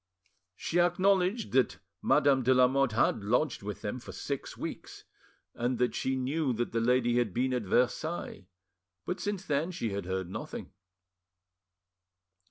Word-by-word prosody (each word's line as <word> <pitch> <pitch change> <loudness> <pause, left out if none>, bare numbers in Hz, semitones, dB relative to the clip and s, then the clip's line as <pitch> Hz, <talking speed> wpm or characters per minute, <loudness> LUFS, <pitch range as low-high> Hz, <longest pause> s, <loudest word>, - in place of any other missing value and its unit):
She 175 - -1
acknowledged 185 +4 +2
that 130 -1 +2 0.2
Madame 140 -2 +4
de 130 +1 +3
Lamotte 130 0 +4
had 110 -1 +2
lodged 125 +6 +1
with 105 +1 -6
them 105 +5 -3
for - - -10
six 140 -2 -5
weeks, - - -7 0.5
and 120 +1 -1
that 125 -2 +1
she 130 +2 -1
knew 135 +2 0
that 120 0 -2
lady 120 +1 +2
had 110 -6 -1
been 130 +2 +1
at 125 - 0
Versailles, 125 - -1 0.6
but 180 - -3
since 200 -2 -3
then 150 +3 0
she 120 - -3
had 100 -2 -4
heard 95 -1 -2
nothing. 90 - -7
130 Hz, 145 wpm, -30 LUFS, 115-155 Hz, 0.6 s, Madame